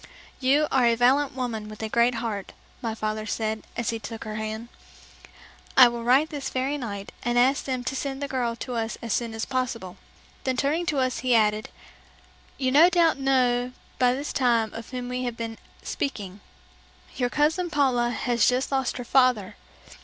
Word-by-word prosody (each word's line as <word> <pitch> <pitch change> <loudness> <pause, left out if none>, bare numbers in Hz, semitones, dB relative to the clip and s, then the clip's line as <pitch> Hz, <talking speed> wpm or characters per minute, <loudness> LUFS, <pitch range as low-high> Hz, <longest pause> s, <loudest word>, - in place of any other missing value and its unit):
"You 280 +3 +3
are 255 -3 +4
a 235 - +4
valiant 260 +3 +3
woman 225 -5 -3
with 215 0 -8
a - - -1
great 235 +2 +2
heart," 225 -4 -4 0.3
my 225 -2 -3
father 215 0 -3
said, 220 -1 -2 0.2
as 235 -1 0
he 225 - -4
took 225 0 -7
her 215 -1 -6
hand. 220 +2 -5 1.1
"I 255 -2 +10
will 235 0 -5
write 265 +6 +4
this 285 -3 -4
very 265 +3 -1
night 200 -5 -6
and 240 0 0
ask 260 +3 +3
them 255 -2 -2
to 265 - -3
send 270 0 -3
the 285 - -3
girl 245 -3 -1
to 245 +2 -6
us 225 -1 -2
as 230 - -1
soon 230 -2 -2
as 225 - -2
possible." 250 -8 -3 0.5
Then 260 -1 -1
turning 310 +6 0
to 300 - 0
us 255 -2 0
he 250 -1 +2
added, 215 -1 +2 0.9
"You 260 -2 0
no 315 +6 +7
doubt 335 -5 +3
know 250 -2 +2 0.3
by 250 0 +4
this 285 +2 -4
time 235 -4 +2
of 230 0 -8
whom 250 -1 -5
we 250 0 -3
have 240 -1 -4
been 225 -1 -5 0.2
speaking. 205 -8 -4 0.8
Your 245 - 0
cousin 315 +6 +1
Paula 260 -6 +2
has 240 -1 +1
just 255 +2 +1
lost 265 -3 0
her 245 - -6
father. 250 -7 +3
245 Hz, 190 wpm, -25 LUFS, 225-265 Hz, 1.1 s, I